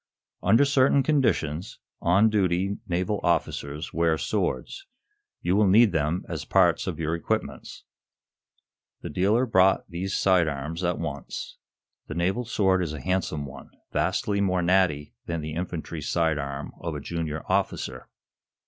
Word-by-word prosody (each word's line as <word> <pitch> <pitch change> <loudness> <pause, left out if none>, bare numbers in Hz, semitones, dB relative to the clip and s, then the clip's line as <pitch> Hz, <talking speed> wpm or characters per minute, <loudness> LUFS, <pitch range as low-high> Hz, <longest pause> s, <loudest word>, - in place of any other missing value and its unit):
"Under 115 +9 +5
certain 140 0 +4
conditions, 95 - 0 0.2
on 100 +6 +4
duty, 95 -1 +1
naval 95 +4 -1
officers 75 -3 -1
wear 80 -1 +2
swords. 110 - -2 0.6
You 90 +2 +2
will 105 0 +4
need 105 +3 +6
them 80 +2 -1
as - - -4
parts - - +3
of - - -3
your 80 0 -1
equipments." 85 - -3 1.2
The - - -6
dealer 105 - +2
brought 95 -4 +3
these 95 +1 -3
side 90 -4 +3
arms 80 +4 -4
at 90 0 0
once. 70 -4 -6 0.5
The 80 - -6
naval 95 +8 0
sword 95 -5 +2
is 80 -4 -2
a 75 - -5
handsome 80 -2 -1
one, 65 -1 -11 0.2
vastly 100 -1 0
more 90 -2 +1
natty 85 -5 +2
than 85 -1 -2
the 75 0 -5
infantry 85 -2 -4
side 80 0 +1
arm 70 0 -5
of 85 -2 -4
a - - -3
junior 80 0 -4
officer. 65 -1 -1
85 Hz, 145 wpm, -26 LUFS, 80-100 Hz, 1.2 s, need